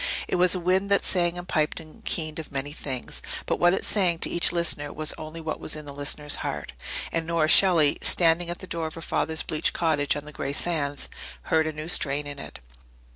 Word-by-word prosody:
It -, -, 0 dB
was 180 Hz, +1 st, +5 dB
a -, -, -2 dB
wind 185 Hz, +3 st, +1 dB
that 200 Hz, -, +2 dB
sang 175 Hz, -1 st, +2 dB
and 175 Hz, 0 st, -7 dB
piped 155 Hz, -4 st, 0 dB
and 155 Hz, -1 st, -14 dB
keened 155 Hz, -1 st, -1 dB
of 160 Hz, -, -8 dB
many 140 Hz, +1 st, -4 dB
things 135 Hz, -4 st, -6 dB, 0.2 s
but -, -, -1 dB
what 175 Hz, +1 st, +4 dB
it -, -, -4 dB
sang 180 Hz, -5 st, +1 dB
to -, -, -1 dB
each 170 Hz, -, +4 dB
listener 170 Hz, -4 st, 0 dB
was 155 Hz, 0 st, -1 dB
only 155 Hz, +1 st, -8 dB
what 155 Hz, -1 st, -4 dB
was 155 Hz, -, -2 dB
in 155 Hz, -1 st, -8 dB
that 145 Hz, -, -8 dB
listener's 145 Hz, +1 st, -1 dB
heart. -, -, -5 dB, 0.4 s
And 165 Hz, -1 st, -2 dB
Nora 165 Hz, -2 st, +1 dB
Shelley, 165 Hz, -5 st, +6 dB
standing 170 Hz, 0 st, +3 dB
at 175 Hz, -, -3 dB
the -, -, -9 dB
door 165 Hz, -3 st, -3 dB
of 155 Hz, -, -9 dB
her 165 Hz, -, -8 dB
father's 160 Hz, -1 st, -1 dB
bleached 155 Hz, -1 st, 0 dB
cottage 155 Hz, -4 st, +1 dB
on 145 Hz, 0 st, -6 dB
the 150 Hz, -, -10 dB
grey 140 Hz, -1 st, -4 dB
sands, 145 Hz, -3 st, -1 dB, 0.4 s
heard 160 Hz, -1 st, +2 dB
a -, -, -1 dB
new 155 Hz, +1 st, -7 dB
strain 145 Hz, -4 st, +3 dB
in 145 Hz, -1 st, -6 dB
it. -, -, -8 dB
160 Hz, 230 wpm, -26 LUFS, 150-175 Hz, 0.4 s, Shelley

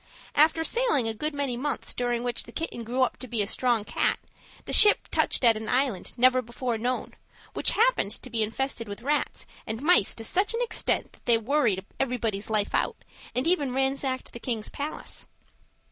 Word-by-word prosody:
After 315 Hz, +2 st, +4 dB
sailing 460 Hz, -, +2 dB
a 225 Hz, -, -1 dB
good 300 Hz, +7 st, -3 dB
many 280 Hz, -4 st, -1 dB
months, 265 Hz, +5 st, -3 dB
during 240 Hz, -1 st, -1 dB
which 245 Hz, -1 st, -2 dB
the -, -, -12 dB
kitten 320 Hz, -8 st, -4 dB
grew 250 Hz, +3 st, 0 dB
up 255 Hz, -, -1 dB
to 255 Hz, -, -9 dB
be 230 Hz, -3 st, -1 dB
a -, -, -3 dB
strong 235 Hz, +1 st, +1 dB
cat, -, -, 0 dB, 0.5 s
the -, -, -4 dB
ship 420 Hz, -1 st, +7 dB
touched -, -, +1 dB
at 230 Hz, -2 st, +6 dB
an 215 Hz, 0 st, -5 dB
island 255 Hz, -8 st, 0 dB
never 255 Hz, +1 st, +5 dB
before 235 Hz, -1 st, -3 dB
known, 250 Hz, +3 st, -2 dB, 0.4 s
which -, -, +2 dB
happened 470 Hz, -, +2 dB
to 255 Hz, -, -8 dB
be 230 Hz, -2 st, 0 dB
infested 230 Hz, +2 st, -2 dB
with 205 Hz, +3 st, -8 dB
rats 295 Hz, +2 st, -1 dB, 0.2 s
and 220 Hz, +4 st, -4 dB
mice 315 Hz, -, +4 dB
to 225 Hz, -, -5 dB
such 390 Hz, -, +1 dB
an 470 Hz, -, -1 dB
extent 455 Hz, -2 st, 0 dB
that -, -, -23 dB
they 235 Hz, -1 st, +6 dB
worried 225 Hz, -5 st, +1 dB
everybody's 230 Hz, -6 st, -1 dB
life 215 Hz, -2 st, 0 dB
out, -, -, 0 dB, 0.4 s
and 255 Hz, -, 0 dB
even 290 Hz, -7 st, +1 dB
ransacked 265 Hz, -1 st, -1 dB
the 235 Hz, -, -8 dB
king's 230 Hz, -3 st, -3 dB
palace. 290 Hz, +2 st, -5 dB
250 Hz, 190 wpm, -27 LUFS, 225-285 Hz, 0.5 s, ship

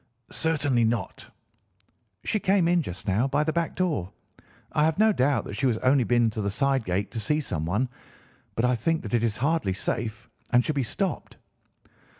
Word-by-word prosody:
"'Certainly 145 Hz, -7 st, +1 dB
not.' 115 Hz, -2 st, -2 dB, 1.0 s
"'She 215 Hz, -, 0 dB
came 190 Hz, -3 st, +3 dB
in 175 Hz, 0 st, +3 dB
just 95 Hz, -, -7 dB
now 105 Hz, +7 st, +2 dB
by 145 Hz, +2 st, +1 dB
the 160 Hz, 0 st, -1 dB
back 170 Hz, -1 st, -1 dB
door. 155 Hz, -, -1 dB, 0.6 s
I 150 Hz, -, +2 dB
have 160 Hz, 0 st, +1 dB
no 215 Hz, +1 st, +5 dB
doubt 140 Hz, -3 st, +2 dB
that -, -, -7 dB
she 135 Hz, +5 st, +1 dB
has 115 Hz, -3 st, +1 dB
only 130 Hz, +2 st, +3 dB
been 120 Hz, -1 st, +2 dB
to 110 Hz, -, -4 dB
the 100 Hz, -, -1 dB
side 135 Hz, +4 st, +1 dB
gate 95 Hz, +3 st, -1 dB
to 115 Hz, -, -4 dB
see 150 Hz, +8 st, +1 dB
someone, 100 Hz, -, -1 dB, 0.7 s
but 115 Hz, -, +1 dB
I 125 Hz, -, +3 dB
think 160 Hz, +8 st, 0 dB
that 105 Hz, -, -6 dB
it 115 Hz, -1 st, +2 dB
is 110 Hz, -3 st, 0 dB
hardly 140 Hz, -, +1 dB
safe 110 Hz, +3 st, -3 dB, 0.2 s
and 125 Hz, 0 st, +4 dB
should 155 Hz, -, 0 dB
be 140 Hz, -, 0 dB
stopped. 180 Hz, -, -3 dB
125 Hz, 190 wpm, -26 LUFS, 110-155 Hz, 1.0 s, no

